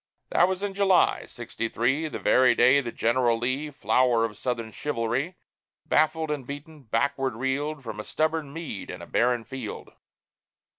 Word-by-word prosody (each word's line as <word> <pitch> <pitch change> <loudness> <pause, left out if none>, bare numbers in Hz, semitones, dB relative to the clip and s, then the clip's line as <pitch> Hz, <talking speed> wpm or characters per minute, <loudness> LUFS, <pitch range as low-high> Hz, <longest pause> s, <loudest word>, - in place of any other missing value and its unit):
That 175 - +5
was 190 +1 -3
in 200 -1 -2
July, 195 -2 +3
sixty 115 -1 -5
three, 135 +9 0
The - - -5
very 125 -2 +4
day 140 +4 +5
that 120 -3 -6
General 120 0 +2
Lee, 130 +6 -2
Flower 125 -4 +2
of 110 -2 -6
Southern 115 0 -3
chivalry, 130 +6 -2 0.5
Baffled 155 0 +2
and 140 -4 -4
beaten, 145 +2 -8
backward 135 +2 -1
reeled 140 +4 -2
From 110 -3 -6
a - - -4
stubborn 155 0 -1
Meade 155 - -6
and - - -7
a - - -7
barren 120 -1 +1
field. 115 -1 -7
135 Hz, 160 wpm, -26 LUFS, 120-155 Hz, 0.5 s, That